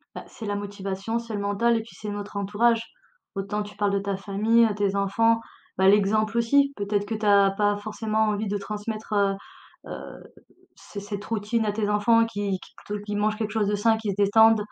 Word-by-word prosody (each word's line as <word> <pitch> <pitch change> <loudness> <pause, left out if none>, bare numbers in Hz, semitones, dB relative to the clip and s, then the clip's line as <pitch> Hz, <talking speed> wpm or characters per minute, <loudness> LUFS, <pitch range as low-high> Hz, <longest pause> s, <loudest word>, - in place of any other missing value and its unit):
Bah, - - -7
c'est 220 - -10
la 205 0 -2
motivation, 200 +2 -4
c'est 230 -1 -8
le 205 - -2
mental 205 +4 +1
et 225 - -1
puis, 230 - -14
c'est 210 - -5
notre 205 0 -6
entourage. 225 +4 +2 0.5
Autant 200 +2 -2
tu 205 0 -12
parles 205 -1 +1
de 200 - +2
ta 200 -1 -3
famille, 215 +4 +3
heu, 215 -2 0
tes 200 -1 0
enfants. 225 +4 +2 0.4
Bah, 190 0 +4
l'exemple, 215 +3 +3
aussi, 280 +4 +3
peut-être 205 0 -1
que 220 - -3
tu 215 0 -4
as 200 -1 +5
pas 205 +1 +1
forcément 215 +1 -1
envie 210 0 -1
de 205 +1 -1
transmettre, 215 +2 -5
heu 200 -1 +2 0.6
heu, - - -8 0.5
c 200 - -9
cette 205 0 -6
routine 225 +1 -1
à 210 - +1
tes 210 0 -1
enfants, 230 +2 +4
qui 205 -4 -3
qui - - -15 0.2
te 205 - -4
qui 205 - -3
mangent 215 +1 0
quelque 215 -2 -3
chose 215 -2 +1
de 210 - +1
sain, 220 +2 +3
qui 220 -2 -4
se - - -5
détendent. 220 +2 +5
210 Hz, 215 wpm, -25 LUFS, 200-220 Hz, 0.6 s, as